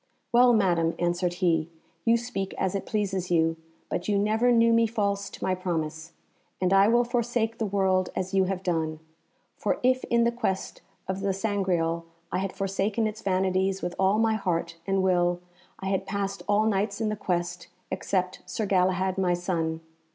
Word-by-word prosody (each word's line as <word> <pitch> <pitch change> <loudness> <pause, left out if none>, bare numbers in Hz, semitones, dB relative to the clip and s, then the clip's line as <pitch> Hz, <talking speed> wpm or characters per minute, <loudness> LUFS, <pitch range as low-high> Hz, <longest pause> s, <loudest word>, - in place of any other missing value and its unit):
"Well, 245 +1 +6
Madam," 175 -7 +2
answered 175 0 0
he, 165 -2 +2 0.4
"you 230 0 +5
speak 230 -5 -4
as 190 -1 0
it 195 - -3
pleases 195 -4 -1
you, 165 -1 +2 0.3
but - - -3
you 205 -1 +2
never 220 +4 +2
knew 230 -1 +5
me 230 0 +4
false 200 -3 -1
to - - -10
my 185 - +1
promise, 165 -3 -3 0.5
and 185 0 +2
I 195 +1 +6
will 240 +2 +4
forsake 235 -1 -1
the 220 - 0
world 190 -2 +1
as 185 +1 -3
you 190 -1 +4
have 190 0 -3
done. 160 -3 -1 0.6
For - - 0
if 255 0 +3
in 235 0 +2
the 235 - +3
quest 220 -6 -3 0.3
of 190 0 -2
the 195 -1 0
Sangreal 185 -5 0 0.3
I 180 - 0
had 195 0 -2
forsaken 195 +3 -1
its 215 0 -3
vanities 190 0 0
with 175 - -2
all 190 +2 +3
my 225 0 +3
heart 170 -5 -1
and 195 -1 +1
will, 175 -1 +2 0.4
I 190 - -3
had 195 -1 -1
passed 200 0 -3
all 210 +1 +3
Knights 200 -1 0
in 220 -2 0
the 215 - -1
quest, 175 -3 -2 0.2
except 185 -1 -1
Sir 210 +4 -2
Galahad 185 0 +1
my 180 -2 +2
son. 165 -2 -2
190 Hz, 180 wpm, -27 LUFS, 180-215 Hz, 0.6 s, Well